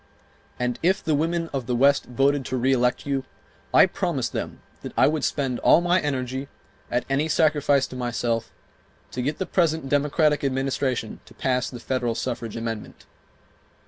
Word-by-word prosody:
And 125 Hz, -1 st, -1 dB
if 185 Hz, +3 st, +2 dB
the 155 Hz, -, +1 dB
women 165 Hz, +3 st, 0 dB
of 130 Hz, -4 st, -3 dB
the 125 Hz, -, 0 dB
West 140 Hz, +3 st, +4 dB
voted 135 Hz, +3 st, +1 dB
to 130 Hz, -, -2 dB
reelect 125 Hz, -1 st, +1 dB
you, 135 Hz, -2 st, -1 dB, 0.5 s
I -, -, +7 dB
promised -, -, -2 dB
them -, -, -5 dB, 0.2 s
that -, -, -7 dB
I -, -, +6 dB
would 150 Hz, -1 st, +1 dB
spend 135 Hz, -4 st, -1 dB
all -, -, +6 dB
my 175 Hz, +1 st, +2 dB
energy, 130 Hz, -1 st, -2 dB, 0.4 s
at 120 Hz, +1 st, -1 dB
any 140 Hz, +3 st, +1 dB
sacrifice 145 Hz, -3 st, +3 dB
to -, -, -10 dB
myself, 120 Hz, -2 st, -2 dB, 0.6 s
to 125 Hz, -, -3 dB
get 145 Hz, +4 st, -1 dB
the 190 Hz, -, -2 dB
present 160 Hz, -6 st, 0 dB
Democratic 150 Hz, +1 st, +2 dB
Administration 135 Hz, -3 st, -1 dB
to -, -, -17 dB
pass 125 Hz, -1 st, 0 dB
the 125 Hz, -, -8 dB
federal 120 Hz, -2 st, -1 dB
suffrage 120 Hz, -2 st, -4 dB
amendment. 115 Hz, -2 st, -6 dB
135 Hz, 165 wpm, -24 LUFS, 125-150 Hz, 0.6 s, I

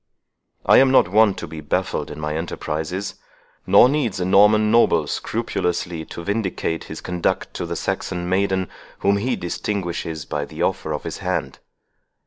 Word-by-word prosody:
I -, -, +6 dB
am 135 Hz, 0 st, +5 dB
not 130 Hz, -9 st, +5 dB
wont 105 Hz, 0 st, +4 dB
to 85 Hz, -, -6 dB
be 80 Hz, 0 st, -8 dB
baffled 75 Hz, -, -2 dB
in -, -, -8 dB
my 75 Hz, 0 st, -3 dB
enterprises, 80 Hz, +3 st, -3 dB, 0.5 s
nor -, -, +7 dB
needs 130 Hz, -8 st, 0 dB
a 90 Hz, -, 0 dB
Norman 105 Hz, +3 st, +5 dB
noble 115 Hz, +1 st, +4 dB
scrupulously 85 Hz, -2 st, -2 dB
to 85 Hz, -, -8 dB
vindicate 95 Hz, -5 st, -2 dB
his 80 Hz, -, -8 dB
conduct 90 Hz, -1 st, -2 dB
to -, -, -4 dB
the -, -, -3 dB
Saxon 90 Hz, -2 st, -3 dB
maiden 95 Hz, 0 st, +1 dB, 0.3 s
whom 100 Hz, +1 st, +3 dB
he 120 Hz, +5 st, 0 dB
distinguishes 85 Hz, -4 st, -3 dB
by 75 Hz, 0 st, -3 dB
the -, -, -5 dB
offer 80 Hz, -, -1 dB
of 75 Hz, -, -3 dB
his -, -, -5 dB
hand. -, -, -3 dB
90 Hz, 160 wpm, -22 LUFS, 80-105 Hz, 0.5 s, nor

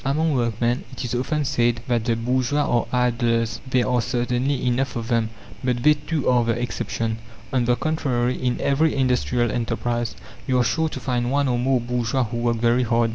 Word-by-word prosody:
Among 150 Hz, +3 st, +1 dB
workmen 120 Hz, -1 st, 0 dB
it 130 Hz, -, -5 dB
is 120 Hz, -, -3 dB
often 145 Hz, +4 st, -1 dB
said 120 Hz, -2 st, +1 dB
that 120 Hz, -3 st, 0 dB
the 115 Hz, -2 st, +2 dB
bourgeois 130 Hz, +5 st, +1 dB
are 120 Hz, -4 st, +1 dB
idlers. 115 Hz, -3 st, +1 dB
There 130 Hz, -2 st, +2 dB
are 125 Hz, -1 st, +2 dB
certainly 125 Hz, +3 st, -1 dB
enough 125 Hz, 0 st, 0 dB
of 115 Hz, 0 st, -4 dB
them, 115 Hz, -2 st, +1 dB, 0.3 s
but 125 Hz, -2 st, 0 dB
they, 150 Hz, -, +7 dB
too, 150 Hz, 0 st, -3 dB
are 125 Hz, -1 st, +4 dB
the 115 Hz, 0 st, 0 dB
exception. 115 Hz, -2 st, -2 dB, 0.3 s
On 125 Hz, -2 st, +2 dB
the 120 Hz, 0 st, +3 dB
contrary, 130 Hz, -5 st, 0 dB
in 125 Hz, -1 st, -1 dB
every 150 Hz, +3 st, +2 dB
industrial 125 Hz, -3 st, +1 dB
enterprise, 120 Hz, 0 st, -2 dB, 0.3 s
you 130 Hz, -1 st, +2 dB
are 125 Hz, -, +4 dB
sure 140 Hz, +9 st, +1 dB
to -, -, -6 dB
find 120 Hz, -2 st, -1 dB
one 140 Hz, +1 st, +1 dB
or 120 Hz, -1 st, +1 dB
more 130 Hz, +1 st, +2 dB
bourgeois 120 Hz, +1 st, 0 dB
who 120 Hz, +1 st, -4 dB
work 120 Hz, 0 st, 0 dB
very 120 Hz, +2 st, +2 dB
hard. 115 Hz, -1 st, +2 dB
120 Hz, 195 wpm, -23 LUFS, 120-130 Hz, 0.3 s, they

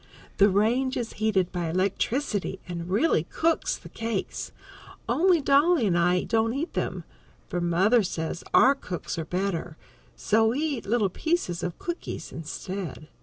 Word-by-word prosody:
The 200 Hz, +1 st, +6 dB
range 235 Hz, +7 st, +2 dB
is 235 Hz, -2 st, -3 dB
heated 205 Hz, -5 st, +1 dB
by 175 Hz, -2 st, -2 dB
electricity 195 Hz, -, -1 dB
and 170 Hz, -1 st, -5 dB
really 200 Hz, -, +2 dB
cooks 325 Hz, -, 0 dB
the -, -, -13 dB
cakes, 225 Hz, -4 st, -4 dB, 0.6 s
only 355 Hz, -1 st, +3 dB
Dolly 285 Hz, +1 st, +4 dB
and 185 Hz, -4 st, +2 dB
I 180 Hz, +1 st, +3 dB
don't 225 Hz, +1 st, +1 dB
eat 315 Hz, +5 st, -3 dB
them, -, -, -2 dB, 0.5 s
for 175 Hz, -2 st, -2 dB
mother 190 Hz, +8 st, +3 dB
says 165 Hz, -3 st, -3 dB
our 270 Hz, -, +6 dB
cook's 180 Hz, -, -5 dB
are 160 Hz, -, -3 dB
better, 180 Hz, -3 st, -2 dB, 0.4 s
so 220 Hz, +1 st, +2 dB
we 240 Hz, +5 st, 0 dB
eat 290 Hz, -9 st, -2 dB
little 215 Hz, -2 st, +2 dB
pieces 250 Hz, -, -1 dB
of 175 Hz, -, -4 dB
cookies 345 Hz, 0 st, -5 dB
instead. 165 Hz, 0 st, -6 dB
205 Hz, 150 wpm, -26 LUFS, 180-260 Hz, 0.6 s, The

